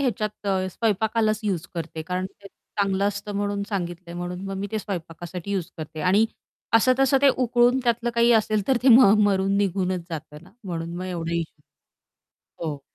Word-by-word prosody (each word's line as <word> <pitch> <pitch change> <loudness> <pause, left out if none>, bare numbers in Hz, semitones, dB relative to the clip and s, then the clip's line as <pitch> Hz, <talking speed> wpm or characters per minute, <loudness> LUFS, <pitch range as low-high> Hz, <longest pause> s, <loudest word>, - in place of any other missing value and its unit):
ह्याच्यात 215 -5 0 0.2
अ, 190 -1 +1
स्वयंपाकालाच 220 +1 +1
युज 185 -5 -1
करते 165 -1 -5
कारण 185 +2 -2
की - - -19
ते 200 - -10 0.3
चांगलं 195 -1 +1
असतं 205 +1 -5
म्हणून 205 0 -1
सांगितलंय, 175 -3 -4
म्हणून 175 +1 -5
मग 195 0 -4
मी 200 +1 -3
ते 220 - 0
स्वयंपाकासाठी 175 -1 -6
युज 185 -3 -2
करते 155 0 -7
आणि 190 +7 +4 0.5
असं-तसं 265 +3 +4
ते 280 - +7
उकळून 245 +1 +3
त्यातलं 240 0 +1
काही 235 0 +4
असेल 215 -2 +2
तर 265 - +4
ते 265 - +4
म 235 -4 +8
मरून 195 0 +2
निघूनच 185 -2 0
जातं 150 -1 -7
ना - - -17
म्हणून 170 -2 -4
मग 185 - -4
एवढं 170 -2 -4
इश्यू 165 -3 -3 0.8
नाही. 165 - -9
हो. 145 -2 -6
195 Hz, 180 wpm, -24 LUFS, 175-220 Hz, 0.8 s, म